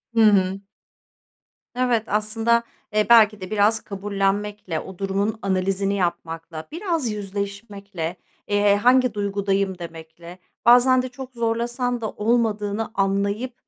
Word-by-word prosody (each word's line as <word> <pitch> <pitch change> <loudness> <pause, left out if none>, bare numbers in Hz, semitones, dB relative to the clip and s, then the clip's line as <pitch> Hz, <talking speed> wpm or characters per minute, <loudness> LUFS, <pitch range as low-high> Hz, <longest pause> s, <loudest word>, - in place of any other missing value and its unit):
Hı - - +3
hı. 195 -2 +3 1.1
Evet, 245 -3 +1
aslında, 225 +3 +1 0.3
eee, 210 0 +3
belki 215 -3 +6
de 185 - -7
biraz 215 +1 +3
kabullenmekle, 200 -2 -2
o 190 - -10
durumun 200 +3 -1
analizini 195 +1 0
yapmakla, 165 -3 -4
biraz 330 - -2
yüzleşmekle, 200 -3 -5 0.3
eee, 205 0 +3
"Hangi 250 +2 +3
duygudayım?" 200 -2 -1
demekle, 170 +1 -10 0.3
bazen 250 +2 +6
de 255 - -5
çok 255 +1 -10
zorlasan 240 +1 -1
da 220 - -2
olmadığını 215 -1 0
anlayıp 200 +5 0
205 Hz, 115 wpm, -23 LUFS, 195-230 Hz, 1.1 s, belki